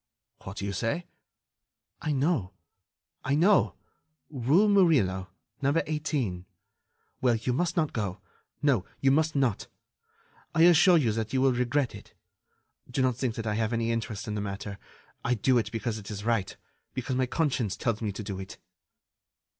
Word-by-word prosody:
"What 95 +2 -7
do 100 - -3
you 100 - -2
say?" 115 - -1 1.0
"I 150 - -1
know... 135 - 0 0.7
I 135 +2 +1
know... 185 +6 +4 0.6
rue 145 - +3
Murillo... 135 - +3 0.3
number 140 +4 +2
18. 140 - -2 0.7
Well, 125 -2 +3
you 115 +3 -1
must 170 +5 0
not 155 -3 +1
go... 100 -4 -3 0.4
no, 135 -10 +3 0.2
you 135 - +3
must 155 +2 +2
not. 130 -7 +1 0.9
I 165 - +5
assure 175 +1 +7
you 125 -8 +2
that 110 +2 -3
you 130 - +2
will 135 -1 +4
regret 125 +2 0
it. - - -13 0.7
Do 130 +1 0
not 130 -2 +2
think 125 -2 -2
that 115 - -4
I 105 - 0
have 110 +1 0
any 115 0 0
interest 115 -2 -3
in 105 - -3
the 105 - -2
matter. 100 0 -5 0.4
I 125 - +1
do 125 +3 +3
it 105 -2 -3
because 115 -1 -3
it 100 - -10
is 105 -1 -5
right... 115 -4 0 0.4
because 130 0 -2
my 130 0 +1
conscience 130 - 0
tells 115 -2 -1
me 105 -2 -1
to 100 +2 -6
do 95 -2 -5
it." 95 0 -8
120 Hz, 170 wpm, -28 LUFS, 105-145 Hz, 1.0 s, assure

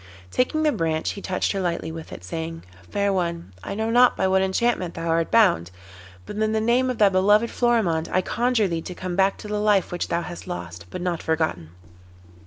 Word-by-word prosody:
Taking 310 +5 +1
the 305 - +4
branch 160 - -1
he 200 - -8
touched 185 -1 -1
her 195 - -2
lightly 170 -2 -2
with 160 0 -8
it, - - -9
saying: 165 - -5 0.3
'Fair 200 -1 0
one, 170 - -2
I - - -5
know 220 +2 -1
not 245 +1 +5
by - - +2
what 190 0 +3
enchantment 190 -2 0
thou 165 0 -4
art 165 0 +1
bound, 190 - +4 0.6
but 210 - -7
in 215 0 +1
the 220 - +2
name 240 +4 +2
of 250 - -2
thy 205 -2 +5
beloved 205 +4 +3
Florimond 215 -10 +1
I 185 - +2
conjure 240 +1 +1
thee 165 -2 -2
to 180 - -7
come 185 -1 -4
back 195 +1 +2
to - - -9
the 210 0 -2
life 210 -3 +2
which 175 - -2
thou 170 0 -1
hast 175 0 -8
lost, 85 0 -7
but 180 - -6
not 175 -2 -1
forgotten. 160 - -1
185 Hz, 215 wpm, -24 LUFS, 165-215 Hz, 0.6 s, not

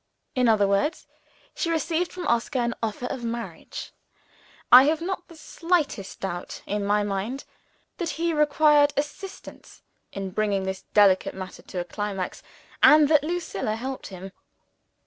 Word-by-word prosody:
In 250 -3 +3
other 210 -3 +4
words, 200 +11 0 0.5
she 335 - -2
received 330 +1 0
from 360 -1 -6
Oscar 235 +3 0
an 235 -1 0
offer 225 +2 -3
of 250 -1 -4
marriage. 235 0 -6 0.8
I 255 +2 +10
have 310 +2 +2
not 360 +1 -4
the 335 - -14
slightest 315 - -2
doubt, 175 -2 -5
in 205 0 -2
my 205 +1 +2
own 205 - -2
mind, 205 +7 -3 0.5
that 345 - -2
he 335 0 0
required 300 -1 +4
assistance 335 +7 -6 0.3
in 195 -1 -5
bringing 200 -1 0
this 190 0 -4
delicate 200 -3 +4
matter 185 -1 -8
to 180 - -6
a 175 - -3
climax 200 -1 -4 0.4
and 300 -1 +7
that 300 -2 +5
Lucilla 315 - -2
helped 260 +3 -5
him. 190 0 -9
245 Hz, 150 wpm, -25 LUFS, 200-310 Hz, 0.8 s, I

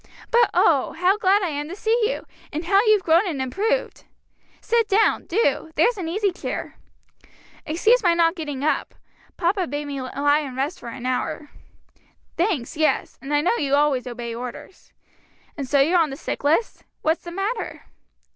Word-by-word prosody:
But 475 0 +5
oh, 285 -6 +3
how 360 +4 +2
glad 400 0 +3
I 360 - 0
am 295 0 -4
to 365 - -6
gee 445 +2 +1
you! - - -4 0.3
and 315 +3 -4
how 390 +3 +4
you've 425 -3 +4
grown 335 +5 +4
and 310 -6 -3
improved. 410 - -1 0.5
Sit 460 -1 +1
down, 415 +3 +2
do. 330 - +1
There's 465 +10 +3
an 345 - -3
easy 400 +3 0
chair. 360 - -6 0.9
"Excuse 430 +11 +3
my 350 -4 +3
not 335 -1 +3
getting 295 -6 -5
up; 305 - -1 0.4
papa 365 +1 0
bade 290 +2 -4
me 280 -2 -5
lie 285 +3 +1
and 270 -4 -6
rest 285 +7 -2
for 235 - -8
an 240 +1 -8
hour." 255 +3 -2 0.8
"Thanks, 335 - -1
yes; 310 0 0
and 275 - -7
I 295 0 +3
know 360 - +2
you 280 -1 +1
always 285 -3 +1
obey 240 -1 -5
orders. 250 +9 -9 0.6
And 275 -4 -5
so 285 - +3
you're 335 +6 +4
on 320 -2 +2
the 270 - -7
sick - - -5
list? 320 +10 +1 0.2
what's 320 +2 +1
the 345 - -7
matter?" 400 +6 -4
325 Hz, 180 wpm, -23 LUFS, 285-390 Hz, 0.9 s, But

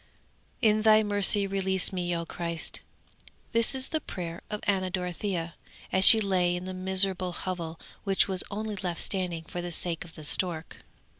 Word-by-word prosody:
In 215 -1 +4
Thy 215 0 +5
mercy 205 0 +2
release 190 -1 +1
me, 175 -1 -2
O 170 0 -4
Christ!' 170 0 -5 0.7
'This 230 +3 +3
was 260 0 0
the 315 -1 -2
prayer 170 -7 -7
of 210 0 -5
Anna 190 -2 0
Dorothea, 180 -2 -3 0.4
as 190 - +2
she 225 - +11
lay 185 -4 +1
in 180 +1 -6
the 185 - -5
miserable 185 -1 -1
hovel 170 -3 -4 0.2
which 195 -2 +2
was 190 -1 -3
only 215 +1 -4
left 180 -3 -4
standing 180 -4 -1
for 175 +2 -6
the 175 0 -5
sake 170 0 -3
of 170 -2 -15
the 155 - -10
stork. 165 +1 0
185 Hz, 170 wpm, -27 LUFS, 175-200 Hz, 0.7 s, she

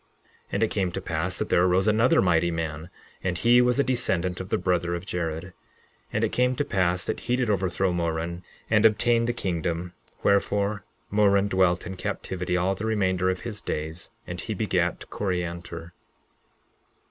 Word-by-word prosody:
11:17 - - -40 0.5
And 100 - +2
it - - +4
came 95 -4 0
to - - -2
pass 85 +2 -2
that - - -2
there 85 - +4
arose 95 +2 +3
another 110 +2 +4
mighty 85 -1 +3
man; 80 -1 -4 0.3
and 90 -2 -1
he 120 +5 +5
was 125 +2 +2
a - - +5
descendant 95 -9 0
of 95 - -8
the - - +1
brother 85 -1 0
of 85 +2 -6
Jared. 80 -3 -3
11:18 90 0 -12 0.6
And - - 0
it - - +1
came 125 +1 +2
to 145 - -1
pass 90 -5 +1
that - - -2
he 120 - 0
did 125 -4 +1
overthrow 95 -1 0
Moron 85 0 -2 0.3
and 105 -1 +3
obtain 115 +2 +4
the 120 - +1
kingdom; 85 -4 -2 0.3
wherefore, 100 +1 +1 0.3
Moron 100 -1 +4
dwelt 95 -2 +2
in 95 0 -6
captivity 90 0 -2
all 90 +2 +1
the 105 +3 -4
remainder 95 -4 +1
of 95 0 -2
his 105 -3 -6
days; 80 +3 -4 0.2
and - - -6
he - - -4
begat - - 0
Coriantor. 85 -3 -3
95 Hz, 180 wpm, -26 LUFS, 85-105 Hz, 0.6 s, he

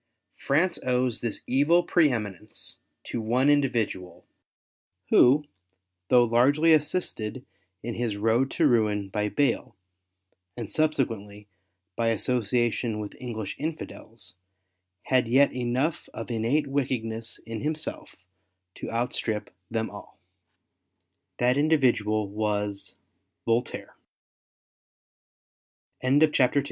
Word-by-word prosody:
France 165 +7 +1
owes 125 -1 +1
this 115 -2 -4
evil 150 +7 +3
pre 170 -4 +4
eminence 105 -3 -4 0.2
to 115 - -4
one 125 +6 +3
individual, 115 -10 -1 0.9
who, 145 +4 +6 0.6
though 125 -1 +6
largely 140 +8 +4
assisted 145 - -1 0.4
in 120 - -3
his 115 -3 -2
road 115 +5 +2
to - - +1
ruin 105 -4 +2
by 105 +1 -1
Bayle, 120 0 0 0.8
and 115 -4 -5
subsequently 110 -10 -1 0.5
by 115 - 0
association 115 0 0
with 105 -1 -6
English 110 -5 -5
Infidels, 115 - -7 0.7
had 130 -3 +2
yet 135 +4 +4
enough 125 +6 -1
of 115 +1 -6
innate 120 +7 +1
Avicked 135 -4 -1
ness 115 +1 -6
in 115 -1 -5
himself 155 +1 -4 0.6
to - - -7
outstrip 115 -2 -2 0.2
them 110 -1 -2
all. 100 - -12 1.2
That 125 +3 +2
120 Hz, 90 wpm, -26 LUFS, 110-135 Hz, 1.2 s, who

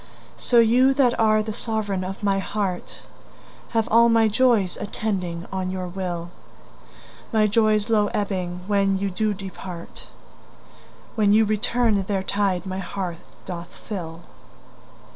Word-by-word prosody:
So 240 - +2
you 245 +4 +5
that 255 -3 +4
are 215 -1 +4
the 215 0 -4
sovereign 205 -4 -2
of 195 +3 -6
my 195 -1 +2
heart 195 -2 -4 0.7
Have 225 -1 0
all 235 +1 +6
my 225 -1 +4
joys 220 -4 +2
attending 185 -5 -3
on 190 -1 -2
your 185 -1 -3
will; 175 -2 -4 1.0
My 220 -2 +3
joys 215 0 +2
low 215 -3 +3
ebbing 185 -4 -2
when 195 -1 +2
you 195 0 -2
do 215 +3 0
depart, 185 -3 -9 1.1
When 210 -3 +3
you 220 +1 +5
return 215 0 +1
their 195 0 -2
tide 195 -2 0
my 190 0 -4
heart 180 -2 -4 0.3
doth 175 -2 -7
fill. 175 -5 -6
200 Hz, 135 wpm, -23 LUFS, 185-220 Hz, 1.1 s, all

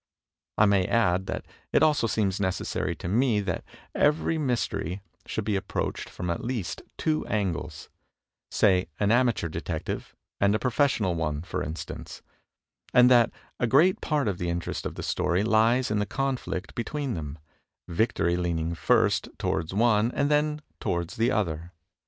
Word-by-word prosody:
I 110 - +6
may 100 -3 +3
add 95 -4 +2
that - - -4 0.3
it - - +4
also 150 -6 +3
seems 100 -4 0
neces 95 -2 -1
sary - - -2
to - - -7
me 115 +3 +2
that 95 -3 -3 0.3
every 155 +2 +2
mystery 115 - -1 0.2
should 110 - -2
be 105 -1 0
approached 95 0 -3
from 90 -1 -4
at 85 - -3
least 115 -7 -3 0.2
two 155 -1 0
angles; 100 -6 -2 0.6
say, 95 -3 +3
an 105 0 +2
amateur 120 -7 +2
detective 80 - -4 0.2
and 100 +1 +3
a - - +3
profes 135 +4 +2
sional 95 -5 0
one, 75 -2 -2
for 85 - -3
instance; 80 +2 -6 0.7
and 125 0 +7
that 120 -2 +6 0.3
a 120 - +2
great 155 +10 +4
part 150 -5 0
of 95 -4 -1
the 90 - -1
interest 85 0 -3
of - - -8
the - - -6
story 90 +1 +1
lies 115 +3 +3
in 105 - +1
the 105 - -1
conflict 115 -7 -3
between 135 +2 -3
them, 75 -3 -5 0.5
victory 85 -2 +1
leaning 85 -2 -1
first 85 - +2
toward 80 +1 -1
one 110 +2 +3
and 145 - +1
then 150 +1 +1 0.2
toward 85 -1 -2
the 115 +2 +1
other. 85 -7 -1
105 Hz, 165 wpm, -27 LUFS, 90-125 Hz, 0.7 s, and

